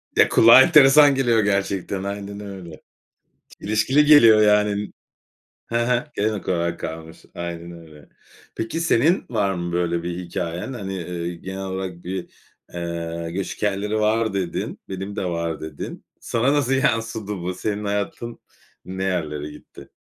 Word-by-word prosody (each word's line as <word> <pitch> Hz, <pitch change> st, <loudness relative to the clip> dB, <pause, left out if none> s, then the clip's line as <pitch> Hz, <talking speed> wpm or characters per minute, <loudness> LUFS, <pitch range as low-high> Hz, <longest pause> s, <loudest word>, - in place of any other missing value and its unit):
Ya, -, -, +5 dB
kulağa 115 Hz, +3 st, +8 dB
enteresan 145 Hz, -2 st, +7 dB
geliyor 120 Hz, -4 st, +2 dB
gerçekten. 100 Hz, -1 st, -1 dB
Aynen 100 Hz, 0 st, -5 dB
öyle. 95 Hz, -6 st, -9 dB, 0.8 s
Çelişkili 130 Hz, +8 st, +2 dB
geliyor 115 Hz, -8 st, +7 dB
yani. 105 Hz, -1 st, +2 dB, 0.8 s
Hı 115 Hz, -, -1 dB
hı. 125 Hz, +3 st, 0 dB
Gelenek 105 Hz, -1 st, -2 dB
olarak 85 Hz, -1 st, -1 dB
kalmış. 80 Hz, 0 st, -8 dB
Aynen 85 Hz, 0 st, -6 dB
öyle. 80 Hz, -4 st, -14 dB, 0.5 s
Peki 115 Hz, +9 st, -3 dB
senin 165 Hz, +2 st, +2 dB
var 100 Hz, -5 st, 0 dB
mı 85 Hz, -1 st, -4 dB
böyle 85 Hz, -1 st, 0 dB
bir 85 Hz, 0 st, -4 dB
hikâyen? 90 Hz, +4 st, -4 dB
Hani, 95 Hz, -6 st, -5 dB
iii, 85 Hz, 0 st, -5 dB
genel 95 Hz, +1 st, -6 dB
olarak 95 Hz, -2 st, -5 dB
bir, 95 Hz, 0 st, -5 dB, 0.4 s
eee, 85 Hz, -1 st, -4 dB
"göç 95 Hz, +2 st, -4 dB
hikâyeleri 105 Hz, +1 st, -1 dB
var" 110 Hz, 0 st, +1 dB
dedin. 95 Hz, -3 st, -3 dB
"Benim 95 Hz, +2 st, -5 dB
de 95 Hz, -, -2 dB
var" 85 Hz, -2 st, -3 dB
dedin. 80 Hz, -2 st, -7 dB
Sana 125 Hz, +4 st, 0 dB
nasıl 140 Hz, -3 st, +1 dB
yansıdı 115 Hz, -6 st, 0 dB
bu? 90 Hz, +1 st, -4 dB
Senin 105 Hz, +2 st, -3 dB
hayatın 105 Hz, +3 st, -3 dB, 0.5 s
ne 95 Hz, +1 st, -5 dB
yerlere 75 Hz, -5 st, -2 dB
gitti? 75 Hz, -, -14 dB
95 Hz, 140 wpm, -22 LUFS, 85-110 Hz, 0.8 s, kulağa